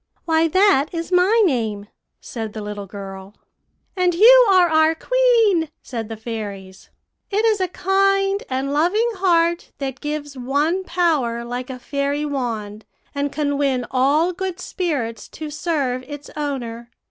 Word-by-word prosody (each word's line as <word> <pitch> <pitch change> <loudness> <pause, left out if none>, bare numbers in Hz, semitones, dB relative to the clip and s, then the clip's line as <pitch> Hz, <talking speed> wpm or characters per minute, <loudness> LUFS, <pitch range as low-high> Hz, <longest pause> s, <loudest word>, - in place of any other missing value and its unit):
"'Why, 325 0 +3
that 375 -4 +4
is 335 +1 -4
my 385 +6 +4
name,' 220 - -1 0.3
said 225 -3 -6
the 215 - -6
little 205 -1 -6
girl. 195 0 -9 0.6
"'And 360 -2 +1
you - - +8
are 370 -2 +5
our 315 0 +3
queen,' 455 -7 +2
said 230 -4 -5
the 225 - -6
fairies. 205 -4 -7 0.4
'It 425 +1 +1
is 430 -3 +2
a 370 - +1
kind 390 +2 +1
and 270 +2 -2
loving 360 +10 +2
heart 340 -2 +1
that 265 -2 -5
gives 295 -1 -4
one 290 +8 0
power 290 -11 0
like 245 +2 -5
a 260 - -6
fairy 280 +3 -2
wand, 225 -7 -4 0.3
and 285 0 -2
can 285 -1 -1
win 265 -3 0
all 290 +7 +2
good 370 -1 -4
spirits 275 - -3
to 310 -1 -7
serve 285 -5 -2
its 290 -1 -9
owner. 240 -6 -4
290 Hz, 145 wpm, -21 LUFS, 245-360 Hz, 0.6 s, you